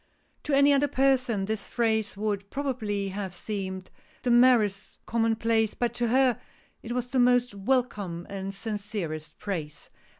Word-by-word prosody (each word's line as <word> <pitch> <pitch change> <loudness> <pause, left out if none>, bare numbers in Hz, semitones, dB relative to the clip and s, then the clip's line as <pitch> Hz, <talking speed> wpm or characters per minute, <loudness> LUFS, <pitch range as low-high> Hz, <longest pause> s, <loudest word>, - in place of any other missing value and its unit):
'To 295 - 0
any 280 +1 +6
other 280 +1 +3
person 255 -7 +2
this 215 0 -3
phrase 220 -3 0
would 200 -1 -2
probably 220 -8 -2
have 190 -1 -5
seemed 190 -1 -5 0.3
the 245 - +1
merest 235 -5 +4
commonplace, 225 -1 +1
but 240 -2 -1
to 240 0 0
her, 255 +1 +3 0.4
it 230 - -7
was 245 0 -1
the 255 +1 -1
most 245 -1 +3
welcome 200 -6 -1
and 195 0 -5
sincerest 200 -7 -5
praise. 160 -7 -5
220 Hz, 140 wpm, -27 LUFS, 195-245 Hz, 0.4 s, any